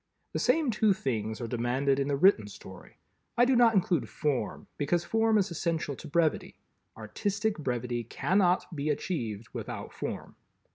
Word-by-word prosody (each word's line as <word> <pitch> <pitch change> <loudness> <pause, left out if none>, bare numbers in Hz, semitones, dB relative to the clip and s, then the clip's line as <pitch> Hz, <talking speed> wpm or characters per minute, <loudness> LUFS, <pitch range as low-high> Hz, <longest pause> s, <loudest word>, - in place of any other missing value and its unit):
The - - -1
same 280 +1 +2
two 215 -1 +3
things 110 - -3
are 115 - -3
demanded 125 +4 0
in 140 - 0
the 145 - +1
written 140 - +4
story. 95 -2 -12 0.4
I 240 - +6
do 260 +1 +3
not 235 -2 +5
include 180 -3 +1
Form, 135 -8 -2
because 165 +4 +1
Form 225 0 +2
is 195 -3 +1
essential 165 -3 -2
to - - -9
Brevity. 160 +1 0 0.4
Artistic 205 -1 -2
Brevity 125 -3 -2
cannot 180 - +1
be 145 +1 -2
achieved 115 - -3
without - - -6
Form. - - -6
155 Hz, 155 wpm, -29 LUFS, 125-200 Hz, 0.4 s, I